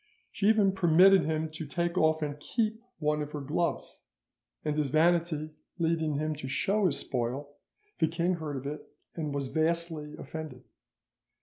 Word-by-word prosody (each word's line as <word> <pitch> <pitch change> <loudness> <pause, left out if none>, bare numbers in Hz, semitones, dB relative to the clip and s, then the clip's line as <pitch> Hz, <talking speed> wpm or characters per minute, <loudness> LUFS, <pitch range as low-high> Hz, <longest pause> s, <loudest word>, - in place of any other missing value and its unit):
She 200 - 0
even 210 -3 +4
permitted 185 +1 +6
him 160 0 -1
to 155 0 -6
take 170 +4 -1
off 160 -2 +3
and 145 -1 -4
keep 220 +5 -1 0.2
one 150 -1 0
of 150 0 -5
her 150 - -3
gloves, 150 +5 -2 0.6
and 150 -1 0
his 150 -2 0
vanity 160 0 +2 0.3
leading 160 -3 +1
him 155 +2 -1
to 135 - -6
show 195 +9 +2
his 160 - 0
spoil, 130 +4 -3 0.5
the 160 - +4
king 170 +3 0
heard 150 -4 -4
of 130 - -7
it, 150 +1 -5 0.3
and 155 -3 -3
was 140 -2 -2
vastly 160 0 -1
offended. 160 -1 -7
155 Hz, 165 wpm, -30 LUFS, 150-170 Hz, 0.6 s, permitted